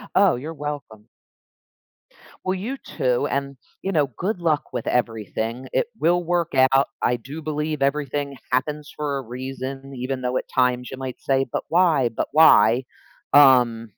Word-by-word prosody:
Oh, 195 Hz, -2 st, +5 dB
you're 150 Hz, +7 st, -6 dB
welcome. 145 Hz, -8 st, -7 dB, 1.4 s
Well, 185 Hz, -, +1 dB
you 225 Hz, +9 st, -4 dB
too, 125 Hz, -, -1 dB
and 140 Hz, -1 st, -3 dB, 0.2 s
you 195 Hz, -, -2 dB
know, 150 Hz, -6 st, +2 dB
good 190 Hz, +1 st, -2 dB
luck 155 Hz, -3 st, +1 dB
with -, -, -4 dB
everything, 115 Hz, +1 st, -2 dB
it -, -, +1 dB
will 175 Hz, +2 st, +2 dB
work 170 Hz, -1 st, 0 dB, 0.2 s
out. 135 Hz, +1 st, +4 dB
I 120 Hz, -, +1 dB
do 140 Hz, +7 st, -9 dB
believe 150 Hz, -1 st, -3 dB
everything 140 Hz, 0 st, -1 dB
happens 150 Hz, +4 st, -1 dB
for 145 Hz, -2 st, -2 dB
a -, -, -3 dB
reason, 130 Hz, +2 st, -6 dB
even 130 Hz, +1 st, -3 dB
though 125 Hz, 0 st, -1 dB
at -, -, -3 dB
times 125 Hz, -1 st, +1 dB
you 130 Hz, -, -7 dB
might 130 Hz, -1 st, -6 dB
say, 135 Hz, 0 st, +1 dB
"But -, -, -2 dB
why? 160 Hz, -8 st, +3 dB
But 115 Hz, -, -3 dB
why?" 125 Hz, -6 st, +6 dB, 0.5 s
Um 125 Hz, -5 st, +6 dB
140 Hz, 160 wpm, -23 LUFS, 125-155 Hz, 1.4 s, why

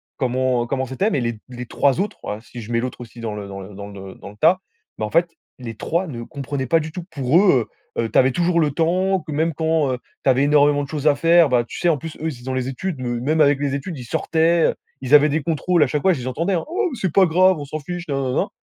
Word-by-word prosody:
comment 130 Hz, -2 st, 0 dB
comment 130 Hz, +2 st, -2 dB
c'était, 160 Hz, -, -1 dB
mais 145 Hz, -, +1 dB
les 115 Hz, -3 st, -3 dB
les 125 Hz, 0 st, -7 dB
3 140 Hz, +5 st, +1 dB
autres, 205 Hz, -, -3 dB
ouais, 105 Hz, -, -4 dB
si 120 Hz, +1 st, -10 dB
je 110 Hz, +2 st, -8 dB
mets 115 Hz, -, +1 dB
l'autre 125 Hz, +1 st, -5 dB
aussi 120 Hz, 0 st, -11 dB
dans 110 Hz, -2 st, -4 dB
le 100 Hz, -1 st, -6 dB
dans 95 Hz, 0 st, -7 dB
le 95 Hz, +1 st, -10 dB
dans 100 Hz, +1 st, -7 dB
le 95 Hz, -1 st, -10 dB
dans -, -, -11 dB
le 105 Hz, -, -15 dB
tas, 175 Hz, -, +4 dB, 0.4 s
ben, 110 Hz, -, -2 dB
en 105 Hz, -, -5 dB
fait 170 Hz, +2 st, +3 dB, 0.3 s
les 115 Hz, -2 st, -6 dB
3 170 Hz, -, -1 dB
ne 120 Hz, -5 st, -6 dB
comprenaient 140 Hz, -1 st, -5 dB
pas 165 Hz, +5 st, +4 dB
du 155 Hz, 0 st, -6 dB
tout. 180 Hz, -1 st, -5 dB
Pour 140 Hz, +1 st, +2 dB
eux, 135 Hz, -, +3 dB, 0.3 s
heu, 115 Hz, -1 st, 0 dB
tu -, -, 0 dB
avais 130 Hz, 0 st, +5 dB
toujours 170 Hz, +3 st, +1 dB
le 150 Hz, -2 st, +1 dB
temps, 185 Hz, +5 st, +1 dB
que 150 Hz, -, -4 dB
même 160 Hz, +2 st, 0 dB
quand 160 Hz, -2 st, +1 dB
heu, 125 Hz, -, -2 dB, 0.3 s
tu -, -, +3 dB
avais 130 Hz, +1 st, +4 dB
énormément 145 Hz, 0 st, +4 dB
de -, -, -6 dB
choses 150 Hz, -1 st, -5 dB
à 150 Hz, -2 st, +5 dB
faire, 165 Hz, +1 st, +5 dB
bah, 120 Hz, -2 st, +2 dB
tu -, -, -8 dB
sais, 175 Hz, -, +2 dB
en 155 Hz, -, +2 dB
plus, 160 Hz, +3 st, -8 dB
eux, 160 Hz, -, -1 dB
ils 155 Hz, -, -5 dB
étaient 120 Hz, -, -15 dB
dans 130 Hz, -, -3 dB
les 130 Hz, 0 st, -2 dB
études, 155 Hz, +4 st, -4 dB
me 120 Hz, -1 st, -2 dB
même 155 Hz, +6 st, +1 dB
avec 145 Hz, -1 st, +4 dB
les 140 Hz, -1 st, -1 dB
études, 145 Hz, +3 st, -5 dB
ils 125 Hz, -, -8 dB
sortaient, 165 Hz, +6 st, +2 dB, 0.3 s
ils 130 Hz, +1 st, -2 dB
avaient 150 Hz, 0 st, +8 dB
des 155 Hz, +1 st, -1 dB
contrôles, 170 Hz, +1 st, +2 dB
à -, -, +2 dB
chaque 150 Hz, +2 st, -1 dB
fois, 190 Hz, +3 st, +4 dB
je 155 Hz, -, -4 dB
les 125 Hz, -, -5 dB
entendais, 165 Hz, +9 st, -1 dB
hein: 170 Hz, -, 0 dB
«Oh, 375 Hz, +4 st, 0 dB
mais 255 Hz, -, -6 dB
c'est 190 Hz, -5 st, -1 dB
pas 195 Hz, -, +6 dB
grave, 185 Hz, +1 st, +4 dB
on 145 Hz, -, -6 dB
s'en 155 Hz, +2 st, -5 dB
fiche 175 Hz, +3 st, -6 dB
nin 140 Hz, -, -1 dB
nin 130 Hz, -, -2 dB
nin 125 Hz, -, -1 dB
nin». 195 Hz, -, 0 dB
145 Hz, 300 wpm, -21 LUFS, 125-165 Hz, 0.4 s, avaient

